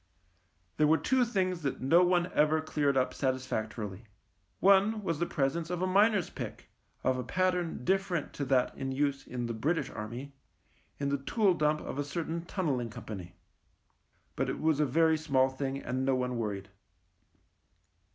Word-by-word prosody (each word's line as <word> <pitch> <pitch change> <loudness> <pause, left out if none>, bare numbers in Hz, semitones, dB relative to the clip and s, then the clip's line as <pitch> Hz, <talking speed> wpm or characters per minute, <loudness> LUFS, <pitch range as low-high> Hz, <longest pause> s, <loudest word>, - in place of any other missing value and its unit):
There 150 - +4
were 160 +1 +5
two 260 +6 +2
things 185 -6 -1
that 140 -3 -2
no 165 +7 +5
one 180 0 +2
ever 155 +1 +3
cleared 145 -3 0
up 130 - +1
satisfactorily. 115 -6 -3 0.5
One 200 +3 +4
was 165 -5 -1
the 175 - 0
pre 135 -2 +1
sence 165 +4 -4
of 180 0 -2
a - - +3
miner's 200 0 +3
pick, - - -7 0.3
of 130 -1 +1
a - - -2
pattern 180 -1 -1
different 190 -4 0
to 140 - -3
that 130 -1 +2
in 135 0 -3
use 140 0 -1
in 120 -1 -3
the 115 - -3
British 150 +10 -1
Army, 120 +6 -6 0.7
in 140 -1 0
the 140 0 0
tool 205 +5 +2
dump 150 -2 +1
of 140 - -5
a - - +1
certain 165 +3 -3
Tunnelling 145 - -1
Company. 105 -6 -8 1.0
But - - -1
it - - -3
was 155 -2 +2
a 150 - +3
very 160 +3 +3
small 135 -4 +2
thing, 135 0 -3
and 130 0 -2
no 135 0 +2
one 125 -1 -1
worried. 100 -3 -3
145 Hz, 170 wpm, -30 LUFS, 130-175 Hz, 1.0 s, were